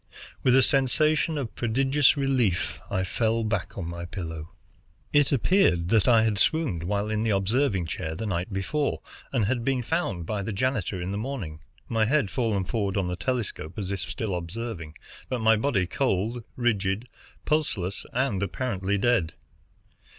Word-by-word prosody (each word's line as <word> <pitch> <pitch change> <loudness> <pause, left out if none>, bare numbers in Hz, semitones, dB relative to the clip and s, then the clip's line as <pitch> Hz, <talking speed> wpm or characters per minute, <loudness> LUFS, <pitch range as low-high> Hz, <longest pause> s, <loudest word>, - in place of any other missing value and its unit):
With 125 -1 +4
a 135 - +6
sensation 155 +4 +3
of 130 -6 -4
prodigious 135 +5 +3
relief, 130 -10 +1
I 95 -2 0
fell 115 +4 0
back 110 0 -2
on 90 -4 -3
my 85 0 -5
pillow. 80 -3 -6 0.6
It 145 -2 +4
appeared 125 - +3
that 110 +1 +3
I 115 -3 +6
had 105 -3 +1
swooned 150 - +2
while 100 +4 -1
in 110 0 0
the 115 - +1
observing 100 0 +2
chair, 80 0 -4
the 110 - -4
night 90 0 -2
before, 140 +10 -1 0.3
and 120 -6 +1
had 120 +2 0
been 130 -1 0
found 110 - -1
by 105 +3 -2
the 100 - -3
janitor 110 -3 -1
in 90 +2 -3
the 100 - -2
morning, 105 - -5 0.3
my 110 -1 +2
head 130 -5 +1
fallen 110 -5 0
forward 100 0 -1
on 95 -2 0
the 90 - -2
telescope, 100 -6 -3
as 100 -2 -3
if 100 - -2
still 110 +1 -3
observing, 90 -2 -5 0.3
but 130 - -1
my 110 0 +6
body 105 -5 +1
cold, 115 +2 -1
rigid, 110 -2 0 0.4
pulseless, 105 - -1
and 120 -6 0
apparently 100 -1 -1
dead. 100 -7 +2
110 Hz, 165 wpm, -26 LUFS, 95-130 Hz, 0.6 s, a